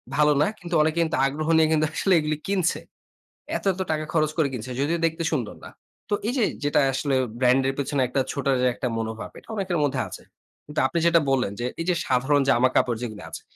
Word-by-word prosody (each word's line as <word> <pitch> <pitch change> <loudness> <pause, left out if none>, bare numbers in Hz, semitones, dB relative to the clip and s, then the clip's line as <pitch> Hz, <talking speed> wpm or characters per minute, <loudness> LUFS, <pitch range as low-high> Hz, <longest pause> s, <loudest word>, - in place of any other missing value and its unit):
ভালো 150 0 +4
না। - - +4
কিন্তু 175 -1 -4
অনেকে 155 +1 +1
কিন্তু 160 - -1
আগ্রহ 150 +3 -2
নিয়ে 160 -1 +4
কিন্তু 155 0 +3
আসলে 195 - +2
এগুলি 155 -1 -1
কিনছে। 185 -3 +1 0.8
এত, - - -11
এত 190 - -5
টাকা 155 0 -1
খরচ 155 -2 +2
করে 155 - +3
কিনছে, 125 +1 -5
যদিও 165 +4 0
দেখতে 165 +1 -1
সুন্দর 120 -9 -2
না। - - -9 0.4
তো - - 0
এই 245 - 0
যে 235 - +3 0.2
যেটা 145 - +2
আসলে 135 0 0 0.2
ব্র্যান্ডের 130 +1 +3
পেছনে 140 -1 -1
একটা 135 +2 0
ছোটা 140 -1 -1
যে 125 - +3
একটা 125 - -3
মনোভাব। 110 0 -4
এটা - - -24
অনেকের 190 -4 -1
মধ্যে 145 - 0
আছে। - - -10 0.4
কিন্তু 150 - -4
আপনি 170 +5 -1
যেটা 170 0 +5
বললেন, 125 -7 +1
যে 120 - -2 0.2
এই - - -3
যে 180 - +3
সাধারণ 135 +3 +2
জামা 130 0 +4
কাপড় 120 -2 +2
যেগুলি 110 -4 -6
আছে। - - -8
145 Hz, 215 wpm, -24 LUFS, 130-165 Hz, 0.8 s, যেটা